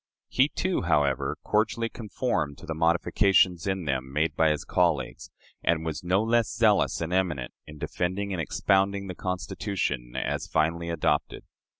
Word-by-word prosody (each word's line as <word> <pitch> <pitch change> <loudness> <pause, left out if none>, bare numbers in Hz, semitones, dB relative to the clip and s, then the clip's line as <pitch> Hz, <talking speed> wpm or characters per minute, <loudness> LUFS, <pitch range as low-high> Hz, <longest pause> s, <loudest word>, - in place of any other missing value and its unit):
He, 135 +3 +3
too, 185 +3 -1
however, 75 -6 +1
cordially 115 +2 +1
conformed 110 - -2
to - - -12
the 80 - -3
modifications 85 +2 +3
in 95 -3 -1
them 65 -2 -2
made 75 +3 0
by 80 -1 +4
his 75 0 -1
colleagues, 85 -6 0 0.3
and 80 -1 +1
was 80 0 -4
no 95 +4 +2
less 115 0 +2
zealous 110 -6 +2
and 85 +2 -2
eminent 85 -10 0
in 75 0 -10
defending 95 +6 -2
and 90 - -1
expounding 100 +3 +1
the 95 - -5
Constitution 90 - -3
as - - -2
finally 85 +2 0
adopted. 85 - 0
90 Hz, 155 wpm, -27 LUFS, 80-100 Hz, 0.3 s, by